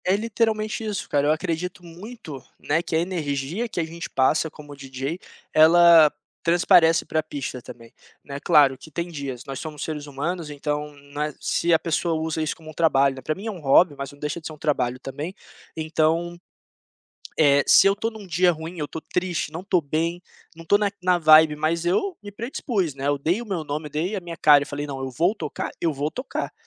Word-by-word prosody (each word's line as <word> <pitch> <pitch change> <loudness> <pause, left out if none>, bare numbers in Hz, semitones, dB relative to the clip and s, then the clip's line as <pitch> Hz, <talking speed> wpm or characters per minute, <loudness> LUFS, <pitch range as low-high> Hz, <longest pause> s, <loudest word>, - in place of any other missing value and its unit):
É 185 - +3
literalmente 220 0 -1
isso 210 -2 -4
cara, 145 0 +1
eu - - +4
acredito 175 +2 -3
muito, 170 - -10 0.2
né, 155 +3 0
que 170 - -4
a - - +3
energia 165 - -2
que 180 - -4
a - - +1
gente 165 +1 -7
passa 145 +4 +2
como 145 -1 -12
DJ, 135 +4 -5 0.3
ela 165 -1 +7 0.3
transparece 170 -1 +4
pra 155 - 0
pista 140 -4 -6
também, 115 -1 -13 0.3
né. 140 0 -6
Claro 140 -2 +5
que 140 - -14
tem 170 +3 -4
dias, 140 -5 -6
nós 135 -1 -6
somos 150 -2 -6
seres 150 -2 -5
humanos 150 +4 -4
então, 150 0 -3 0.2
na 150 +1 -2
se 170 - 0
a 165 - +6
pessoa 165 +1 -1
usa 160 0 -2
isso 155 - -2
como 155 -1 -12
um - - -15
trabalho, 140 -4 +3
né, 130 - -9
para 155 +4 -2
mim 195 - -9
é 225 - -2
um 190 - -9
hobby, 150 +3 +4
mas 140 0 -6
não 145 - -16
deixa 150 +3 -4
de - - -6
ser 155 - -8
um - - -13
trabalho 140 -5 -1
também. 145 +9 -6 0.4
Então, 160 +2 0 1.0
eh, 140 -2 +5
se - - +7
eu 195 - +4
tô 225 +2 -2
em 220 -2 -10
um - - -12
dia 180 +1 +3
ruim, 160 +3 -8
eu 150 - -2
tô 160 - -7
triste, 180 -3 -2
não 165 +2 -6
estou 185 -2 +1
bem, 165 +4 -2 0.3
não 165 - -11
tô 200 +5 +4
na 205 -1 +1
na 180 -1 +3
vibe, 155 -2 +6
mas 165 +2 -1
eu 355 - 0
me 205 - -8
predispus, 205 - -3
né, 140 0 -3
eu 145 0 +1
dei 170 +10 0
o - - -7
meu 185 -7 -3
nome, 150 +1 -4
dei 165 +8 -2
a 195 - -4
minha 170 -1 -8
cara 145 -2 +6
e - - -9
falei: 145 +1 -5
"Não, 135 -2 -5
eu 135 0 -4
vou 170 - +1
tocar, - - -5
eu 165 - +1
vou 145 +1 -2
tocar". 255 - -5
160 Hz, 220 wpm, -24 LUFS, 145-175 Hz, 1.0 s, ela